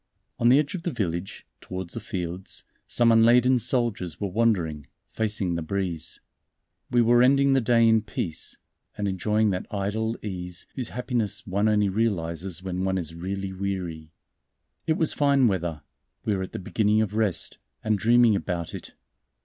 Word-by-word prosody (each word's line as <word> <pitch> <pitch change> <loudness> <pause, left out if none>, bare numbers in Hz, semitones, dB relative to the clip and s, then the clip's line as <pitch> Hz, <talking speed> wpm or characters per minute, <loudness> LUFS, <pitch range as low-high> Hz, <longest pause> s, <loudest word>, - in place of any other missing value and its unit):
On 120 - +4
the 130 - +7
edge 145 -1 +1
of 185 - -4
the 175 - -2
village, 95 - -3
towards 90 -2 -6
the - - -4
fields, 95 -3 -5 0.2
some 120 -1 +3
unladen 120 +3 +5
soldiers 115 - -1
were 100 -2 -2
wandering, 90 - 0 0.2
facing 105 -5 0
the 85 - -2
breeze. 90 -1 -3 0.7
We 120 -1 +4
were 120 +1 +5
ending 140 +2 +5
the 135 - +3
day 115 0 +4
in 110 -1 +4
peace, 85 -6 -4 0.4
and 105 - -1
enjoying 105 +3 +1
that 90 - -3
idle 110 +3 -2
ease 90 -4 -5
whose 125 -4 -3
happiness 120 -4 -2
one 100 +3 +1
only 105 -1 +3
realizes 95 -4 -2
when 95 -1 -3
one 95 0 0
is 80 -3 -4
really 95 +3 -4
weary. 90 -5 -4 0.8
It 160 - +4
was 155 -1 +2
fine 140 -3 +4
weather, 85 -7 -2 0.4
we 105 - +1
were 95 - -2
at 95 - -5
the - - -3
beginning 105 +3 +1
of 105 -1 -4
rest, 105 -4 -1 0.2
and 110 -1 +2
dreaming 120 0 +5
about 85 -4 -3
it. - - -9
105 Hz, 165 wpm, -26 LUFS, 90-115 Hz, 0.8 s, the